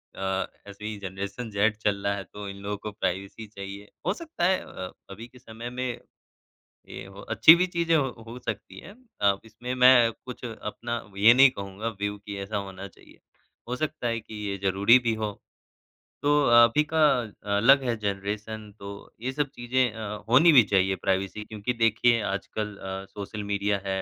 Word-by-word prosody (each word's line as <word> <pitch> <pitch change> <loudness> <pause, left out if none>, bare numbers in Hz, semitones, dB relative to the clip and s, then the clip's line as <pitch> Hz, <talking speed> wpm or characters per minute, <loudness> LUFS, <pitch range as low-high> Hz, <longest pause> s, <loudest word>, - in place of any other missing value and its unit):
अ, 95 0 -1 0.2
ऐसी 105 +1 -6
generation 100 +4 -5
Z 105 +1 +2
चल 100 -2 -1
रहा 100 - +2
है, 100 - -5
तो 105 +1 -9
इन 100 - -8
लोगों 105 0 -3
को 105 +1 -6
प्राइवेसी 100 +1 -4
चाहिए। 100 0 -9 0.2
हो 185 - +2
सकता 315 - -6
है 185 +1 +3
अ, 90 0 -8 0.2
अभी 110 +4 -9
के 125 - -18
समय 115 0 -8
में, 125 -1 -4 0.9
ये - - -8
हो 95 +1 -12
अच्छी 160 - +9
भी 185 - +2
चीज़ 170 -2 -2
है, - - +6
हो 135 -3 0 0.2
हो 120 +2 -7
सकती 110 -4 -6
हैं 200 - -12 0.3
अ, 100 -1 +4
इसमें 120 +3 -6
मैं 125 -2 +6
कुछ 125 0 -8
अपना 120 0 -5 0.2
ये 115 +4 +8
नहीं 135 +1 +8
कहूँगा 100 0 -5
व्यू 105 0 -2
कि 100 0 -8
ऐसा 100 +2 -4
होना 95 -1 -5
चाहिए, - - -20 0.5
हो 125 - -2
सकता 155 -3 -3
है 115 -1 -1
कि 110 0 -12 0.2
ये 100 - -2
ज़रूरी 100 +5 +5
भी 120 -2 0
हो। 110 -1 -3 0.9
तो 145 - +2 0.3
अभी 120 +6 +4
का 160 - +2 0.6
अलग 135 +6 +6
है 120 -2 0
जनरेशन 105 +2 -4
तो 100 0 -7 0.3
ये 130 +2 -2
सब 145 0 -1
चीज़ें 125 0 +1
अ, 105 -2 -6
होनी 150 +8 +7
भी 125 -5 +9
चाहिए 95 -1 +2
प्राइवेसी 95 +2 -1
क्योंकि 110 +3 -3
देखिए, 115 0 +3
आजकल 105 +1 -3
अ, 95 0 -6
सोशल 105 +1 -6
मीडिया 100 0 0
है 95 0 -1
110 Hz, 185 wpm, -26 LUFS, 100-120 Hz, 0.9 s, अच्छी